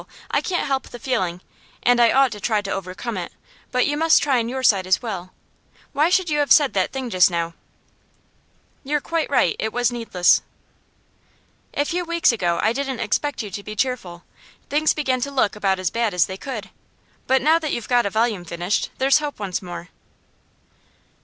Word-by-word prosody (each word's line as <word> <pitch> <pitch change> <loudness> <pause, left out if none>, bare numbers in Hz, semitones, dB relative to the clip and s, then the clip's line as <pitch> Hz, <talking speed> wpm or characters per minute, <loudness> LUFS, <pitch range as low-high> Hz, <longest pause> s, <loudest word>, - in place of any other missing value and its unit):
I - - +2
can't 360 -1 -1
help 270 -1 -2
the - - -9
feeling, 190 -9 -2 0.4
and 245 0 +4
I 230 -1 +6
ought 270 -2 +4
to 210 - -7
try 215 0 0
to 195 - -4
overcome 195 +4 -4
it. 175 - -5 0.4
But 250 -1 +2
you 290 - 0
must 325 +1 +4
try 270 -4 +2
on 230 0 -2
your 260 +1 -4
side 195 -6 +3
as 185 - +3
well. 190 -6 -6 0.6
Why 300 +4 +3
should 370 0 +2
you 300 -2 0
have 290 - 0
said 290 -3 +6
that - - 0
thing 260 -3 -5
just 185 -1 +5
now?' 170 -1 -2 1.3
'You're 295 +2 0
quite 330 +2 -2
right. 220 - +2
It 220 - -1
was 245 +1 +1
needless.' 225 -7 +2 1.3
'A 290 - +1
few 355 +4 -2
weeks 340 -3 +2
ago 175 -7 0
I 220 - +3
didn't 270 -2 -3
expect 255 +4 -1
you 205 - -7
to 205 - -5
be 215 +1 -8
cheerful. 205 -9 -3 0.5
Things 305 +2 +3
began 260 -4 0
to 280 - -1
look 260 -7 +1
about 195 -2 +1
as 185 -2 -2
bad 230 -4 -1
as 175 - +4
they 190 - -6
could. 220 -1 -7 0.6
But 260 -1 +3
now 320 +3 +4
that 310 -2 -3
you've 235 - -3
got 245 -4 +3
a - - -1
volume 220 -3 0
finished, 175 +3 -2
there's 270 +3 +4
hope 295 -1 -5
once 195 -4 -3
more. 175 -1 -8
235 Hz, 200 wpm, -22 LUFS, 195-280 Hz, 1.3 s, I